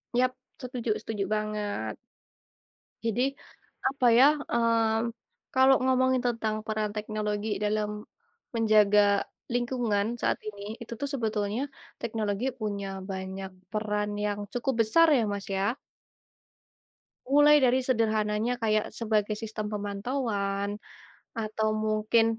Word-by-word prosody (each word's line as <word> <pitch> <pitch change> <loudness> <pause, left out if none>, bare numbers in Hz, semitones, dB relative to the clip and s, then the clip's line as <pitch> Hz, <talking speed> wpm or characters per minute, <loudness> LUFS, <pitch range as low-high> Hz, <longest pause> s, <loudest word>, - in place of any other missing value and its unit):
Yap, 255 +1 +3 0.3
setuju 245 -4 -2
setuju 205 -3 -3
banget. 210 - -2 1.1
Jadi 230 +1 +1 0.7
apa 265 -1 0
ya, 260 - +8 0.3
eee, 230 0 +2 0.4
kalau 265 +1 +6
ngomongin 260 0 +3
tentang 225 -2 -1
peran 215 -1 -1
teknologi 210 0 -2 0.2
dalam 210 0 0 0.7
menjaga 215 -2 +5 0.5
lingkungan 240 -4 0
saat - - +1
ini, 205 -1 -6 0.2
itu 235 0 -6
tuh 285 - 0
sebetulnya 220 -2 -1 0.4
teknologi 215 0 -2
punya 205 -2 -3 0.2
banyak 190 0 -5 0.2
peran 210 -1 -1 0.2
yang 205 0 -1
cukup 245 +2 0
besar 330 +10 +5
ya - - +3
Mas 200 -1 -4
ya. 205 +7 0 1.5
Mulai 290 +3 +6
dari 255 +1 +4
sederhananya 220 -2 +1
kayak 215 -1 +2
sebagai 215 -2 0
sistem 215 -1 -4
pemantauan 205 -1 -2 0.6
atau 220 -1 -1
mungkin 215 +1 +2
215 Hz, 105 wpm, -28 LUFS, 210-235 Hz, 1.5 s, ya